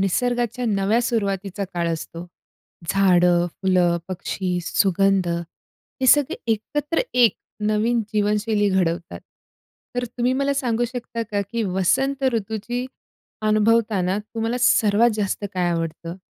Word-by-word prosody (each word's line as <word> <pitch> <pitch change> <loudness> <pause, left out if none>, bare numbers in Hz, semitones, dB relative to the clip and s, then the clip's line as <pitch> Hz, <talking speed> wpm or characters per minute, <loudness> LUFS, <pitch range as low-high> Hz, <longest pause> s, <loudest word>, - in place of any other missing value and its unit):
निसर्गाच्या 245 +4 0
नव्या 205 +2 +2
सुरुवातीचा 200 -4 -2
काळ 170 -1 0
असतो. 165 +2 -6 0.6
झाडं, 180 -2 +4
फुलं, 180 -1 +1
पक्षी, 185 0 -3
सुगंध 195 0 +2
हे 170 +9 -6
सगळे 285 +1 +4 0.2
एकत्र 295 +9 -2
एक 245 -3 +5 0.3
नवीन 220 +3 +1
जीवनशैली 210 0 +1
घडवतात. 175 -2 -1 0.8
तर 245 - 0
तुम्ही 245 +1 -1
मला 275 +2 0
सांगू 240 -4 0
शकता, 240 -1 -5
का 210 -2 -2
की 235 -1 0
वसंत 220 +9 0
ऋतूची 225 +3 -3 0.6
अनुभवताना 215 -3 +2
तुम्हाला 225 +3 -3
सर्वात 225 0 +4
जास्त 205 0 -2
काय 180 -1 +1
आवडतं? 165 0 -4
210 Hz, 115 wpm, -22 LUFS, 185-235 Hz, 0.8 s, एक